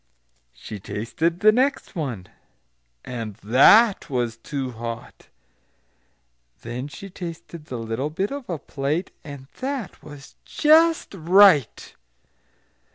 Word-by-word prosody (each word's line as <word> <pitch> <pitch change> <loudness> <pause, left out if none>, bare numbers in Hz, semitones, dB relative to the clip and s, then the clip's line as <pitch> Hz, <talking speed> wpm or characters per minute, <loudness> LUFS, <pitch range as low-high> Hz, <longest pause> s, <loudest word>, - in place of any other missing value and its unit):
She 100 - -9
tasted 160 - -3
the 215 - +7
next 265 +1 0
one, 125 - -4 0.8
and 115 -4 -6
that 195 - +5
was 120 -4 -1
too 135 +2 -5
hot. 115 0 -8 1.4
Then 120 +3 -5
she 180 +7 -10
tasted 170 -3 -9
the 125 - -6
little 115 +5 -3
bit 190 - -3
of 280 -5 -7
a 170 - -2
plate, 145 +5 -3
and 140 -3 -10
that 265 -4 -5
was 145 -2 -13
just 325 0 +3
right!" 180 - +4
150 Hz, 110 wpm, -23 LUFS, 120-195 Hz, 1.4 s, the